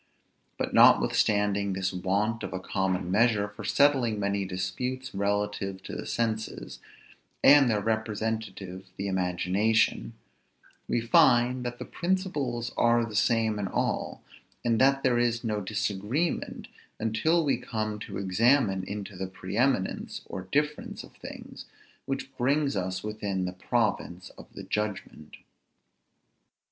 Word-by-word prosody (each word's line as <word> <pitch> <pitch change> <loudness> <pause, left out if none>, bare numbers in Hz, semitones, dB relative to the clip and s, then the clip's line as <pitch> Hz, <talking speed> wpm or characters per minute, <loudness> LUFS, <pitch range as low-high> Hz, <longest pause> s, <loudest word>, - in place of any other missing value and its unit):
But - - -3
notwithstanding 100 -1 +4
this 95 0 -2
want 100 +5 0
of - - -5
a 95 - -3
common 95 -1 -1
measure 105 0 +3
for 105 - -10
settling 130 -7 +3
many 100 0 0
disputes 125 +8 -4
relative 100 -1 -2
to - - -7
the - - -6
senses, 110 -2 -3 0.6
and 140 -2 +7
their 105 -2 +1
representative 110 -3 -3
the 100 - -3
imagination, 95 +4 +1 0.7
we 120 - 0
find 120 +2 +4
that 120 0 -4
the - - -6
principles 150 -10 -2
are 120 0 +3
the 110 -2 -8
same 110 0 +2
in 100 - -2
all, - - -2 0.4
and 115 -2 +2
that 135 +1 +4
there 125 -2 +3
is 120 0 +1
no 105 -2 -1
disagreement 110 - -2 0.3
until 115 +10 +1
we 135 -4 +2
come 110 -4 -3
to - - -6
examine 100 +1 +2
into 100 0 -6
the 95 +1 -4
pre 95 +1 -7
eminence 120 -5 0
or 95 0 -7
difference 150 +1 -1
of - - -15
things, - - -10 0.4
which 135 0 -4
brings 140 +1 +1
us 95 -1 -2
within 105 -3 -2
the 90 - -4
province 95 -3 -1
of - - -15
the - - -8
judgment. 105 -7 -4
110 Hz, 135 wpm, -28 LUFS, 95-120 Hz, 0.7 s, and